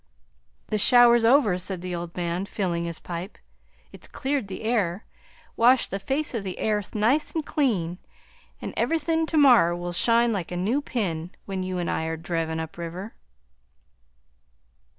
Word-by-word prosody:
"The 215 - 0
shower 240 +2 +7
's - - -3
over," 225 -6 +4
said 185 -1 -2
the 180 0 -5
old 170 0 -6
man, 175 +2 -2
filling 175 -5 -2
his 170 -1 -4
pipe; 175 +3 -7 0.5
"it's - - -13
cleared 270 -5 -2
the 195 +2 -7
air, 210 -4 0 0.5
washed 245 +2 +4
the 195 - -2
face 270 +10 -2
o' 230 - -1
the 190 -3 -6
airth 210 -2 -2
nice 240 +11 +1
an' 320 - 0
clean, 195 - -1 0.6
an' - - -5
everything 325 0 0
to 320 - -1
morrer 245 - +6
will 175 0 -5
shine 230 +5 +3
like 185 -5 -4
a 175 - -3
new 220 +11 0
pin 180 - -3 0.2
when 190 -1 -4
you 185 0 -3
an' 175 -1 -2
I 160 - -1
are 160 0 -3
drivin' 165 -1 -3
up 160 +1 -7
river." 175 +5 -6
195 Hz, 170 wpm, -25 LUFS, 175-240 Hz, 0.6 s, shower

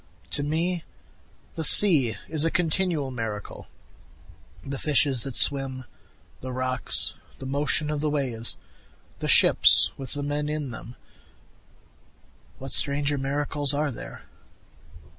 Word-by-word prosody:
To 145 - 0
me 165 +4 -3 0.7
the 160 - -6
sea 145 - +6
is 155 -2 -2
a 165 - +1
continual 170 -4 -1
miracle, 110 -4 -7 1.0
The 135 -1 -6
fishes 140 -4 +1
that 135 -1 -6
swim 135 -2 +3 0.6
the 130 - -8
rocks 130 0 +2 0.2
the - - -10
motion 145 +2 -1
of 150 -1 -4
the 155 - -1
waves 125 -6 -4 0.6
the - - -5
ships - - +6
with 135 -2 -7
the 145 0 -5
men 145 +1 -4
in 150 -3 -5
them, 115 +1 -9 1.6
What 135 0 -10
stranger 145 0 -1
miracles 145 +1 -2
are 150 0 -2
there? - - -11
145 Hz, 120 wpm, -24 LUFS, 130-150 Hz, 1.6 s, sea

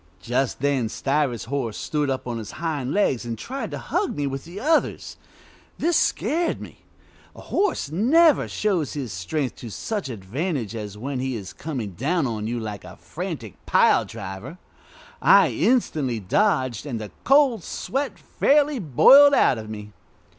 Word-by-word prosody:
Just 125 +1 -1
then 135 -5 +1
Stiver's 135 -1 -1
horse 120 -4 -3
stood 150 -2 -1
up 130 -1 -2
on 120 -2 -3
his 110 -1 -8
hind 150 -6 -3
legs 145 - +1
and 115 -1 -5
tried 270 - -5
to - - -5
hug 410 - -2
me 145 - -1
with 135 -1 -4
the 175 +4 -8
others. 310 +7 0 0.6
This 340 +1 +1
scared 335 +3 +1
me. - - -11 0.6
A - - -11
horse 395 - -1
never 290 - +4
shows 185 -9 -1
his 135 -9 -5
strength 125 - -3
to 120 - -8
such 200 - -4
advantage 120 - -3
as 105 -2 -6
when 130 +4 -4
he 130 -1 -2
is 100 -4 -7
coming 130 -10 -5
down 145 - 0
on 110 -3 -3
you 120 +1 -2
like 105 -3 -6
a - - -11
frantic - - -7
pile - - +4
driver. 100 - -8 0.6
I - - +6
instantly 150 - +1
dodged, 130 - 0
and 120 -5 -3
the 105 -1 -7
cold 270 - +4
sweat 275 +2 -3
fairly 290 -1 +2
boiled 275 - +7
out 125 - +3
of 110 -1 -8
me. 105 -1 -8
135 Hz, 160 wpm, -24 LUFS, -, 0.6 s, boiled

